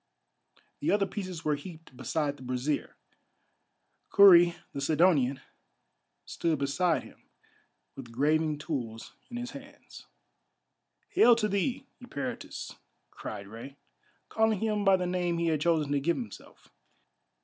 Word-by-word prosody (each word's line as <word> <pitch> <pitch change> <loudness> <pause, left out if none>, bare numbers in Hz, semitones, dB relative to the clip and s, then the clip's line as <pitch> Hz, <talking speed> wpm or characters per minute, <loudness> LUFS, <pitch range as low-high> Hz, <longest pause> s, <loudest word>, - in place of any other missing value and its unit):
The - - -1
other 205 -1 +3
pieces 185 -4 -6
were 150 - +2
heaped 160 -1 -11
beside 145 +3 -2
the - - -16
brazier. 130 +3 -2 1.1
Kurri, 175 -4 +7 0.2
the 140 - -4
Sidonian, 145 -3 +3 0.8
stood 165 -2 -1
beside 150 +5 +1
him, - - -17 0.7
with 125 -4 -10
graving 150 +4 +1
tools 125 -8 -5 0.2
in 240 - -6
his 245 0 -5
hands. 280 +2 -13 1.0
"Hail 240 0 +6
to 220 -2 0
thee, 205 +6 -1 0.2
Eperitus," 145 -13 -6 0.3
cried 100 - -7
Rei, 115 +6 -10 0.5
calling 220 -2 +1
him 215 -1 0
by 195 -1 +5
the 180 - -2
name 175 -1 -1
he 170 0 +1
had 155 -2 0
chosen 155 -3 +1
to 145 - +2
give 170 +5 0
himself. 240 -3 -10
165 Hz, 125 wpm, -29 LUFS, 140-195 Hz, 1.1 s, Kurri